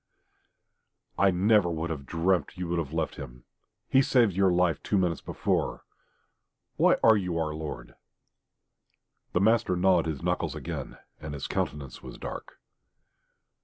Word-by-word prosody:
"I 100 - +5
never 95 0 +3
could 80 +1 -3
have 70 -4 -6
dreamt 85 +1 0
you 90 -1 -3
would 85 0 0
have 75 -4 -4
left 80 -1 -2
him. - - -9 0.4
He 135 - +4
saved 120 -7 +3
your 95 0 +3
life 90 -4 +2
two 100 - 0
minutes 90 -4 0
before.... - - -2 0.9
Why - - +4
are 110 - +7
you 90 -5 -1
our 80 -2 -1
lord?" 60 -6 -7 1.4
The 90 - +2
master 110 -3 +3
gnawed 90 -2 +3
his 75 -4 -4
knuckles - - -1
again, - - -6 0.2
and 75 -1 -6
his 70 - -5
countenance 70 -4 -3
was - - -10
dark. - - -7
85 Hz, 145 wpm, -28 LUFS, 75-95 Hz, 1.4 s, are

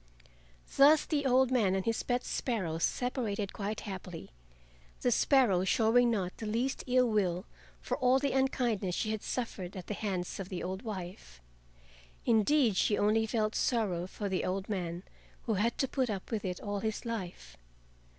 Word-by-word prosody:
Thus 295 +2 +7
the 285 -3 0
old 260 0 +4
man 210 -7 +3
and 190 - -1
his 230 -1 0
pet 245 0 -1
sparrow 185 -10 -2
separated 220 -2 -1
quite 210 +1 -4
happily, 185 - -7 0.7
the 245 - +2
sparrow 235 -8 +4
showing 230 +5 +4
not 190 -6 -1
the 220 - -5
least 240 +5 -1
ill 250 0 +4
will 190 -4 0 0.4
for - - -2
all 255 -1 +4
the 275 0 0
unkindness 240 -8 0
she 215 - -1
had 220 -1 -3
suffered 195 -7 -4
at 180 - -7
the - - -4
hands 190 -4 -3
of 190 -1 -5
the 185 - -4
old 190 +1 -4
wife. 185 - -7 0.9
Indeed, 235 -1 +3
she 205 - +2
only 220 +2 +2
felt 215 -1 0
sorrow 195 -8 0
for 205 +2 -5
the 190 -1 -1
old 190 +1 -2
man 180 -3 -3 0.4
who 225 - 0
had 220 +4 0
to 270 - +1
put 260 -2 -1
up 200 0 -5
with 215 -3 -2
it 180 -1 -3
all 205 -1 -3
his 220 +3 -3
life. 185 - -5
215 Hz, 170 wpm, -31 LUFS, 190-245 Hz, 0.9 s, Thus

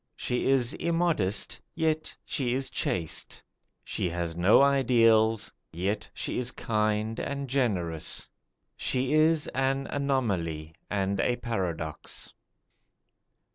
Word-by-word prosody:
She 125 - -1
is 130 -2 +3
immodest, 165 - 0
yet 160 -2 -1
she 125 -4 -1
is 135 0 -2
chaste. 85 -10 -2 0.4
She 90 - -2
has 85 -1 -3
no 90 +5 +6
ideals, 115 -5 +4 0.2
yet 95 +6 -2
she - - -3
is 125 -1 0
kind 110 -1 0
and 140 -1 -3
generous. 95 - -1 0.5
She 130 +2 0
is 155 0 +4
an 135 +1 0
anomaly 95 - -1 0.2
and 100 -1 0
a 120 - +2
paradox. 90 -10 -4
115 Hz, 105 wpm, -28 LUFS, 95-135 Hz, 0.5 s, no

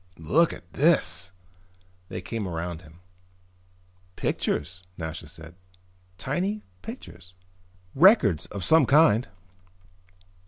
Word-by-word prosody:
"Look 155 - +2
at 85 - -12
this!" 95 - +3 0.8
They - - -5
came 105 +2 -4
around 85 -1 -5
him. 80 +1 -18 1.1
"Pictures," 85 +5 -2 0.2
Nasha 80 -1 -6
said. 80 +1 -11 0.6
"Tiny 185 - -2 0.2
pictures." 90 0 -11 0.6
"Records 135 - +5
of 100 -3 -6
some 160 -5 +5
kind." 140 -5 +4
90 Hz, 90 wpm, -26 LUFS, -, 1.1 s, Records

